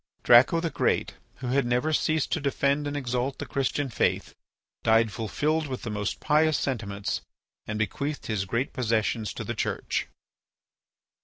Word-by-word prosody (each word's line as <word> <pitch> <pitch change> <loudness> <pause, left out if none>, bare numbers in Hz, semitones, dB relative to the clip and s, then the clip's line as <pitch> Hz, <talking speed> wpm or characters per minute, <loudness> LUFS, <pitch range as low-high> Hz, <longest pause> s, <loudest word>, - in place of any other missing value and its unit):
Draco 125 +7 +7
the 165 -1 -2
Great, - - 0 0.2
who 130 - -6
had 135 +2 +3
never 125 +6 +1
ceased 155 0 +1
to - - +1
defend 140 +1 +1
and 145 0 -3
exalt 125 0 -2
the - - -5
Christian 140 +1 -1
faith, 115 - 0 0.5
died 110 0 +4
fulfilled 150 +9 -1
with 130 -2 -5
the 110 - -4
most 105 0 -2
pious 155 0 +3
sentiments 100 -6 -2 0.5
and 105 - -3
bequeathed 140 +8 -2
his 105 -4 -1
great 115 +7 -1
possessions 110 -3 0
to - - -4
the - - -3
Church. - - -2
130 Hz, 155 wpm, -27 LUFS, 110-145 Hz, 0.5 s, Draco